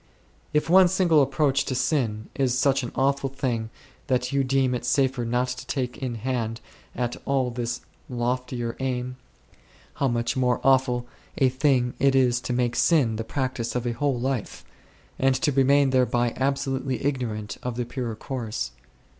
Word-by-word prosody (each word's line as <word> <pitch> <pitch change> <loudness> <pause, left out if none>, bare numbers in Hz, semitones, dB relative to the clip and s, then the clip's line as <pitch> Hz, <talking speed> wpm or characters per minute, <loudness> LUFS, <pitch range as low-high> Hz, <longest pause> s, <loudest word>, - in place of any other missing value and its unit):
If 150 +1 +1
one 185 +2 +7
single 175 -4 +4
approach 135 0 +2
to 130 - -2
sin 115 -6 0
is 130 -3 +1
such 135 +1 +3
an 120 - -5
awful 140 0 +1
thing 120 -4 -2 0.4
that 125 -2 0
you 140 -1 +2
deem 130 -1 +2
it 125 - -3
safer 130 -1 +1
not 125 +2 0
to 125 0 -6
take 125 -3 -3
in 130 -3 -3
hand 115 -1 -2 0.4
at 120 -1 -2
all 130 -3 0
this 120 0 -3 0.3
loftier 125 -1 -2
aim, 125 -1 -2 0.8
how 140 - 0
much 120 -1 0
more 125 -2 +2
awful 130 -2 +3 0.3
a 130 - +4
thing 130 -2 +2
it 135 0 +3
is 125 -2 +3
to - - -4
make 120 -1 0
sin 130 -10 +3
the 115 - -2
practice 130 -1 -3
of 125 -1 -1
a 120 - 0
whole 130 +1 0
life, 130 -2 -3 0.5
and 135 0 +3
to 145 +3 +1
remain 140 0 +4
thereby 120 -2 +2
absolutely 135 0 -1
ignorant 115 -7 -2
of 125 -2 -4
the 120 0 -2
purer 120 -2 -4
course 110 - -4
130 Hz, 165 wpm, -25 LUFS, 120-135 Hz, 0.8 s, one